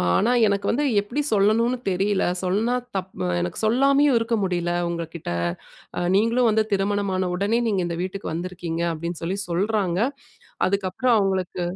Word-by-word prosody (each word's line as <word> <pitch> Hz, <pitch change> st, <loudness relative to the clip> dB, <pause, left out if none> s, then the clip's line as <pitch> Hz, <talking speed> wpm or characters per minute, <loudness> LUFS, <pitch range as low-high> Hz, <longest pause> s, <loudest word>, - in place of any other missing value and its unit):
ஆனா 230 Hz, +5 st, +3 dB, 0.2 s
எனக்கு 200 Hz, -1 st, 0 dB
வந்து 290 Hz, +5 st, 0 dB, 0.2 s
எப்படி 240 Hz, +8 st, -3 dB
சொல்லணும்னு 220 Hz, +5 st, +3 dB
தெரியல. 195 Hz, +2 st, +1 dB, 0.2 s
சொன்னா 215 Hz, +7 st, +1 dB, 0.2 s
தப் 190 Hz, 0 st, -3 dB, 0.3 s
எனக்கு 90 Hz, -, -3 dB
சொல்லாமயும் 275 Hz, +3 st, +4 dB
இருக்க 230 Hz, 0 st, 0 dB
முடியல 175 Hz, -2 st, -1 dB, 0.2 s
உங்ககிட்ட. 170 Hz, -, -5 dB, 0.7 s
அ -, -, -1 dB
நீங்களும் 230 Hz, +3 st, +3 dB
வந்து 220 Hz, 0 st, +3 dB
திருமணம் 200 Hz, 0 st, 0 dB
ஆன 185 Hz, -1 st, 0 dB
உடனே 205 Hz, +5 st, +1 dB
நீங்க 195 Hz, -3 st, +1 dB
இந்த 170 Hz, -, -4 dB
வீட்டுக்கு 190 Hz, -1 st, -5 dB
வந்திருக்கீங்க 170 Hz, -1 st, -4 dB
அப்டீன்னு 170 Hz, +1 st, -5 dB
சொல்லி 190 Hz, +4 st, -2 dB
சொல்றாங்க. 190 Hz, 0 st, 0 dB, 0.7 s
அதுக்கு 195 Hz, 0 st, 0 dB
அப்புறம் 250 Hz, +4 st, +2 dB
அவங்களுக்கு" 190 Hz, -2 st, -1 dB
195 Hz, 150 wpm, -23 LUFS, 180-225 Hz, 0.7 s, சொல்லாமயும்